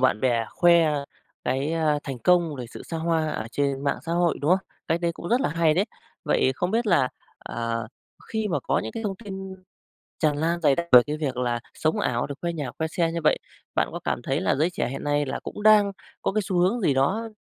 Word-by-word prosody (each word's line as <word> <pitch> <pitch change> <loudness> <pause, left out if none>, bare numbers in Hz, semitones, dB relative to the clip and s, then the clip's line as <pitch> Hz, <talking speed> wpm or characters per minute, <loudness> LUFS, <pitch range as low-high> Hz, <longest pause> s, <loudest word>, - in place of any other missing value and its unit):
bạn 125 -5 +3
bè 120 -3 +1
khoe 170 -3 +5 0.5
cái, 135 +5 0
a, 155 -3 +2
thành 135 -3 -5
công 170 +4 +3
về 125 - -5
sự - - -10
xa 165 - -5
hoa, 160 -1 0
ở 110 - -4
trên 140 -1 -1
mạng 140 - +1
xã 165 +2 -4
hội, 175 -1 +2
đúng 145 - +1
không? 185 - +6 0.3
Cách 165 +1 +1
đấy 170 -1 0
cũng 170 - -7
rất 245 +3 +3
là - - +1
hay 160 -1 +2
đấy. 190 +4 +2 0.4
Vậy 130 - +2
không 180 +5 -1
biết 230 +1 +1
là, 165 -10 +4 0.3
ờ, 115 -1 -3 0.4
khi 220 -1 -1
mà 145 -6 0
có - - 0
những 110 - -4
cái 225 - -5
thông 200 -3 -2
tin 190 -1 -6 0.7
tràn 150 -3 +2
lan 170 +2 0
dày 145 -4 +4
đặc 170 +3 -2
về 125 -1 +10
cái 150 +1 -2
việc 140 -5 -2
là, 120 -1 0
sống 155 0 0
ảo 120 -1 0
rồi 140 - -5
khoe 170 0 -1
nhà, 145 -7 -4
khoe 160 - -1
xe 165 0 0
như 170 - -2
vậy, - - +4 0.4
bạn - - +2
có - - -5
cảm - - -1
thấy 135 +6 -1
là - - +2
giới 155 +5 +2
trẻ 180 - -2
hiện 135 - -5
nay 145 0 +1
là 130 - -3
cũng 210 - -7
đang 210 -2 +6 0.3
có - - 0
cái 215 - +1
xu 190 -2 -2
hướng 195 +7 +2
gì 145 - +3
đó, 195 +13 +1
160 Hz, 250 wpm, -25 LUFS, 135-180 Hz, 0.7 s, về